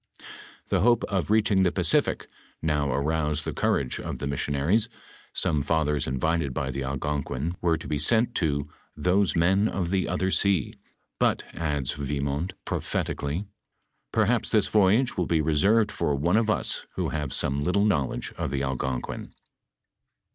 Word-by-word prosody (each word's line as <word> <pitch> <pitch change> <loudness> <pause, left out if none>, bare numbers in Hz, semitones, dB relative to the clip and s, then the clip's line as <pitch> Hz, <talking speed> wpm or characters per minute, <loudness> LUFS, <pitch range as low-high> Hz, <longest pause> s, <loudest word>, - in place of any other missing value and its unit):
The - - +2
hope 120 +1 +3
of 95 -7 -1
reaching 105 -3 +3
the 90 -2 +3
Pacific - - +1 0.3
now 75 -2 0
arouaed 75 +2 0
the - - -4
courage 65 -3 0
of - - -5
the - - -4
miaaion 70 0 -2
ariea, 105 +10 +2 0.5
aome 75 -2 +2
fathera 75 -1 0
invited 70 +1 0
by 65 - -2
the 70 +1 -3
Algonquina 70 +2 -2
were 85 -2 +2
to 80 - -9
be 75 - -1
aent 115 - +3
to 70 -6 0 0.2
" - - -38
thoae 95 +1 +2
men 95 +5 +3
of 90 -4 -2
the 95 -2 0
other 95 +1 0
aea," 95 -10 +2 0.5
but, - - +2
adds 75 -6 -1
Vimont 70 +3 -2
prophet - - -2
ically, 75 +8 -3 0.3
" - - -50
Perhapa - - +1
thia - - +4
voyage 110 +5 +3
will 90 - 0
be 80 - +2
reaerved 100 +9 +3
for 75 - 0
one 85 +7 +1
of 115 -1 +2
ua 105 - +1 0.3
who - - -1
have 75 -2 -3
aome 70 +2 0
little 90 +6 +2
knowledge 75 -11 0
of - - -1
the 70 -1 -2
Algonquin." 65 -1 -3
80 Hz, 165 wpm, -26 LUFS, 70-95 Hz, 0.5 s, thia